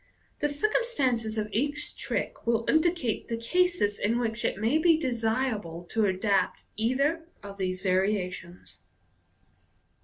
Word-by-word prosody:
The 295 - +1
circumstances 280 - 0
of 210 -1 -1
each 290 +6 0
trick - - -3
will 230 -1 +2
indicate 315 - +1
the 230 - -2
cases 290 - +1
in 225 +3 +1
which 230 -1 -2
it - - 0
may 230 +9 +2
be 330 -1 +5
desirable 225 - -1
to 220 -2 +2
adopt 190 0 +1
either 280 +9 0 0.2
of 200 0 -9
these 185 0 -2
variations. 185 -2 -1
230 Hz, 125 wpm, -28 LUFS, 205-290 Hz, 0.2 s, be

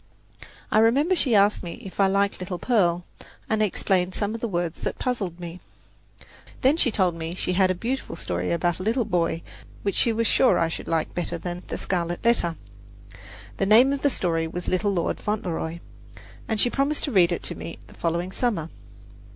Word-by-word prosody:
I 215 - +5
remember 275 +11 +4
she 255 -9 +2
asked 205 +1 +4
me 170 -2 -6
if 190 - -10
I 195 - +5
liked 200 +1 +1
little 185 0 -4
Pearl, 175 -6 +1 0.4
and 220 -1 +1
explained 185 -3 +1
some 205 0 -1
of 230 - -6
the 235 - -1
words 175 -4 -3
that - - -2
had - - -28
puzzled 195 -9 -2
me. 175 0 -7 1.0
Then 270 +4 +4
she 310 -6 +3
told 185 -5 +1
me 165 0 -5
that - - -10
she 180 - -1
had 185 0 +3
a 185 - +1
beautiful 250 +8 -3
story 90 0 -2
about 170 +1 0
a - - -5
little 225 +4 +1
boy 165 -2 0 0.4
which 200 - 0
she 235 - +3
was 230 +1 0
sure 255 +4 +4
I 165 - +2
should - - -6
like 165 -1 -1
better 175 -1 -2
than 175 +1 -5
"The - - -4
Scarlet 175 +1 -2
Letter." 200 -8 +3 1.0
The 195 - +1
name 245 +6 +6
of 280 - -3
the 285 - +3
story 165 -8 0
was 175 +2 -5
"Little 185 +3 +1
Lord 175 -4 -1
Fauntleroy," 170 -5 -3 0.7
and 220 -2 0
she 245 - +4
promised 280 +2 0
to 285 - -2
read 180 -5 +4
it 175 - -2
to - - -3
me 165 - -7
the - - -16
following 170 +2 -2
summer. 195 -8 -1
185 Hz, 205 wpm, -25 LUFS, 170-225 Hz, 1.0 s, name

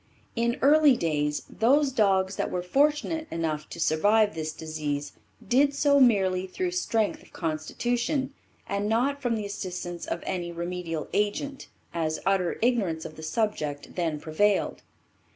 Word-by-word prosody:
In 235 +1 +1
early 290 -2 +6
days, 150 -2 -1
those 275 +5 +3
dogs 195 -5 +2
that - - -1
were 180 - -2
fortunate 300 - +1
enough 155 -2 -3
to 170 - -8
survive 205 +7 +3
this 155 -1 -3
disease 150 -2 -4 0.3
did 280 +3 +3
so 280 0 +4
merely 190 -7 +3
through 360 - -2
strength 225 - 0
of - - -19
constitution 240 - -2 0.3
and 200 +1 -1
not 270 +6 +1
from 245 -3 0
the 215 -2 -3
assistance 180 -3 -5
of 170 - -3
any 175 -2 -3
remedial 170 -2 -4
agent, 240 +7 -1 0.3
as 160 -2 -1
utter 190 -3 +1
ignorance 200 -10 +1
of 155 - -8
the - - -10
subject 155 -6 -2
then 165 -4 -1
prevailed. 195 +7 +1
195 Hz, 145 wpm, -27 LUFS, 165-245 Hz, 0.3 s, early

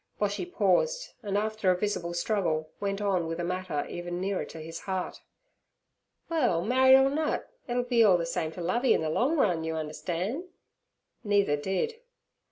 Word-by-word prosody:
Boshy 200 -3 -1
paused, 480 - +1
and 200 -1 -1
after 215 -2 0
a 180 - +3
visible 180 -4 -2
struggle 170 -5 0
went 200 0 -2
on 190 -5 +1
with 165 +1 -4
a - - -1
matter 180 -4 -2
even 175 0 -5
nearer 195 0 -1
his 165 +1 -7
heart. 190 -1 -4 1.1
'Well, 245 - +1
married 260 +3 +6
or 270 0 +5
nut, 310 +1 -1 0.2
it'll 245 0 0
be 245 -2 +3
all 195 -5 +6
ther 170 - -2
same 170 -1 -2
t' 175 - -8
Lovey 235 +10 +2
in - - 0
ther 160 - -1
long 265 - +1
run, 180 - +2
you 160 0 -2
understan'.' 175 - -3 0.8
Neither 200 -7 +3
did. 195 - -2
190 Hz, 170 wpm, -28 LUFS, 170-230 Hz, 1.1 s, married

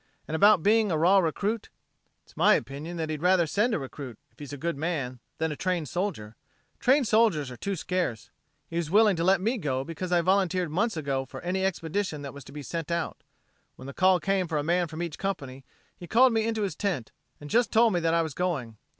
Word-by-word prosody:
And - - -6
about 200 +1 +5
being 215 -1 +3
a 160 - +1
raw 180 +5 +5
recruit.... 200 +6 -1 0.5
It's - - -23
my - - +5
opinion 155 +5 -5
that 160 -1 -2
he'd 155 -1 -4
rather 180 -1 +4
send 210 +9 +1
a - - +1
recruit, 135 -4 -7
if - - -29
he's 145 -2 -8
a 145 - -6
good 170 +3 -2
man, 140 -5 -3 0.2
than 160 0 -1
a - - -3
trained 175 -4 -2
soldier. 160 - -3 0.4
Trained 265 0 +3
soldiers 210 - +2
are - - -7
too 200 +10 -3
scarce. 175 -10 -3 0.4
He 165 - -5
was 170 -3 -1
willing 210 +1 +5
to 165 - -1
let 190 +1 +4
me 225 +6 -1
go 135 -6 -1
because 165 +4 -6
I 175 -1 +4
volunteered 185 -2 +1
months 205 +3 0
ago 140 -3 -1
for - - -9
any 185 +2 -1
expedition 170 -3 -2
that 140 - -7
was 140 -1 -10
to - - -12
be 145 0 -7
sent 165 +3 -5
out. 170 -1 -3 0.5
When 130 - -12
the 140 - -7
call 185 +2 +4
came 195 0 0
for 155 - -2
a 145 - 0
man 175 +2 +1
from 160 +2 -5
each 165 -3 -6
company, 135 -9 -4 0.3
he 175 - -11
called 250 +4 +5
me 225 0 +1
into 220 -2 -1
his 190 -6 -2
tent, 175 - -2 0.3
and 145 - -9
just 235 +9 +2
told 225 -1 +4
me 175 - +2
that 165 -1 +1
I 165 - +3
was 160 -3 -5
going. 140 -12 -2
170 Hz, 235 wpm, -27 LUFS, 150-195 Hz, 0.5 s, about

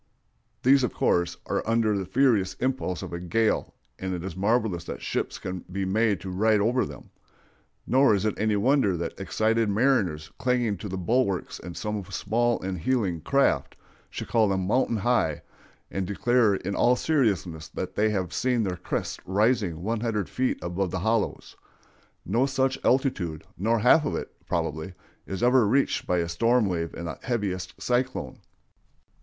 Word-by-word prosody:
These, 135 +1 +5
of 125 - -1
course, 85 0 +1
are - - -1
under 115 -2 +2
the 95 -2 -3
furious 100 -4 +2
impulse 130 -8 -2
of - - -7
a 85 - -3
gale, 110 +6 0 0.2
and 95 -1 -3
it 85 - -6
is 95 -3 -5
marvelous 105 -3 +1
that - - -6
ships - - -3
can 90 0 -5
be 95 +1 -2
made 105 0 +1
to 95 - -6
ride 105 +3 +3
over 120 +2 +1
them; 70 -2 -12 0.7
nor 130 -3 +4
is 100 - -1
it 110 - +1
any 110 0 +2
wonder 105 -3 +2
that 85 0 -3
excited 110 +4 +1
mariners 100 - +1
clinging 120 -5 +1
to 100 - -7
the 95 - -4
bulwarks 100 -1 0
of 85 0 -8
some 105 -2 -3
small 115 +5 0
and 95 -1 -3
heeling 95 -5 0
craft, 140 0 +1 0.3
should - - -6
call 110 -2 +3
them 95 -1 0
"mountain 115 +2 +1
high," 105 -9 +1 0.5
and 95 -2 -2
declare 115 +1 +2
in 95 +1 -4
all 125 +1 +4
seriousness 95 - 0
that - - -5
they 110 +1 +2
have 95 -5 -2
seen 125 -3 +1
their 90 -3 -2
crests - - -3
rising 100 -4 +1
one 115 +2 -1
hundred 105 -4 -1
feet 130 0 -1
above 90 +2 -1
their 95 0 -3
hollows. 110 +1 -1 0.7
No 130 +4 +2
such 135 0 0
altitude, 100 - +1
nor 115 +5 +1
half 125 +8 +5
of 145 - -2
it, - - -5
probably, 80 +4 -2 0.3
is 95 +3 -4
ever 125 -2 +5
reached 135 +6 +1
by 90 - +2
a 85 -1 0
storm 115 +8 +2
wave 85 -3 -2
in 85 - -6
the 85 - -6
heaviest 100 -7 -3
cyclone. 125 - -1
105 Hz, 170 wpm, -26 LUFS, 90-120 Hz, 0.7 s, These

